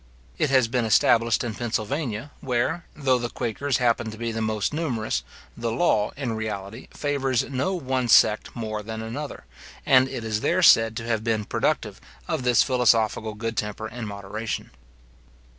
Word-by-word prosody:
It 155 - +2
has 130 -3 +4
been 120 +1 0
established 115 +1 +3
in 120 -2 -3
Pennsylvania, 120 +3 -3
where, 135 +7 -1
though 130 -4 +2
the 120 0 -3
quakers 125 +3 -1
happen 120 -2 +1
to 110 - -9
be 115 0 -3
the 110 0 -3
most 110 +3 -1
numerous, 125 -9 -1 0.3
the 115 -1 -2
law, 110 -5 +2
in 130 -5 -2
reality, 110 0 -5
favours 135 -4 0
no 140 +8 -1
one 130 -6 -1
sect 110 -1 +4
more 110 -2 -4
than 110 +1 -6
another; 130 - -6 0.4
and 130 0 +5
it 120 - -5
is 110 -1 -2
there 185 +2 +1
said 115 -7 +6
to - - -4
have 110 -2 0
been 110 -2 0
productive - - -1 0.3
of - - -1
this 125 -2 +4
philosophical 115 -4 +2
good 115 +1 -4
temper 105 +1 -3
and 115 0 -6
moderation. 100 +2 -5
115 Hz, 165 wpm, -25 LUFS, 110-130 Hz, 0.4 s, said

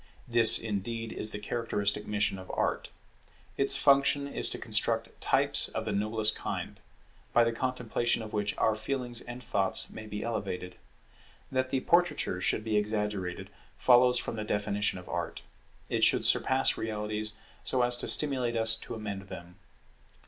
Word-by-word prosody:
This 120 -2 +6
indeed 115 +1 -4
is 110 - +1
the - - -4
characteristic 105 -1 -2
mission 105 -2 0
of 95 - -11
Art. - - -1 0.7
Its 135 0 +3
function 140 0 +3
is - - +2
to - - -4
construct - - -2
types - - +4
of 110 - -4
the 110 - -2
noblest 110 +1 0
kind, - - -5 0.5
by 120 - +5
the 115 - +1
contemplation 120 -1 -1
of 110 - -9
which 105 -1 -2
our 110 - +2
feelings 120 +1 -3
and 120 +1 -9
thoughts 95 -3 -1
may 110 0 -9
be 105 0 -5
elevated. 95 -5 -4 0.8
That 130 -1 0
the 130 - -1
portraiture 170 - +1
should 110 - 0
be 110 -1 0
exaggerated 105 -4 -3 0.3
follows 125 0 +5
from 115 - -3
the 110 - -3
definition 105 -1 -1
of 90 - -11
Art; - - -4 0.4
it - - -1
should - - +4
surpass 130 0 +3
realities 105 0 -3 0.3
so 125 -1 0
as 120 0 +4
to - - -3
stimulate 130 -5 +1
us 110 0 +6
to 115 - -7
amend 100 -3 -6
them. 85 +1 -10
110 Hz, 160 wpm, -29 LUFS, 105-120 Hz, 0.8 s, This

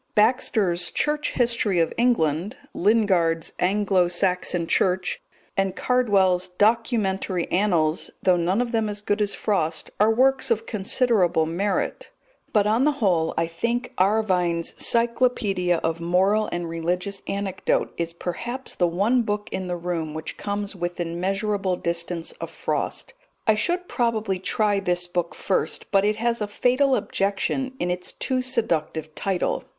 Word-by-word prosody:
Baxter's 210 -6 +2
Church 300 0 0
History 235 -6 +1
of 165 - +1
England, 205 - +1 0.2
Lingard's 180 -6 +2
Anglo 190 -1 +2
Saxon 180 -1 +1
Church, 180 +2 +1 0.3
and 195 -1 0
Cardwell's 200 -8 +2
Documentary 195 -2 +1
Annals, 175 -5 +1
though 185 - +5
none 180 +6 +1
of 240 - -6
them 225 -2 0
as 205 0 -5
good 205 0 -1
as 205 -1 0
Frost, 165 -6 0
are 210 +2 +5
works 260 +3 +3
of 225 -1 +1
considerable 200 -5 +2
merit; 185 +5 -2 0.4
but 210 -2 +3
on 220 +4 +2
the 300 +1 +3
whole 180 - +1
I 165 - +2
think 235 +9 -2
Arvine's 185 -4 +1
Cyclopedia 230 -7 +2
of 165 0 -1
Moral 190 +5 +2
and 175 -1 -3
Religious 180 +4 -2
Anecdote 195 -1 -1
is 170 0 -3
perhaps 240 +10 -5
the 175 - +1
one 205 +9 +2
book 210 -2 -3
in 190 -1 -3
the 175 -1 -2
room 165 -3 -3
which 160 - -5
comes 205 0 -4
within 175 -1 -4
measurable 195 0 0
distance 170 -1 -3
of - - -4
Frost. - - -3 0.3
I 220 - +5
should 350 +12 -1
probably 220 -6 -1
try 205 +2 +1
this 180 -2 0
book 175 -1 -3
first, 190 - -2
but 195 -1 +4
it 210 +1 +2
has 235 +1 -1
a 210 - -1
fatal 255 +6 +2
objection 205 +8 -1
in 180 - 0
its 180 0 -3
too 260 -1 -1
seductive 165 - -1
title. 190 +1 -1
195 Hz, 145 wpm, -24 LUFS, 175-225 Hz, 0.4 s, though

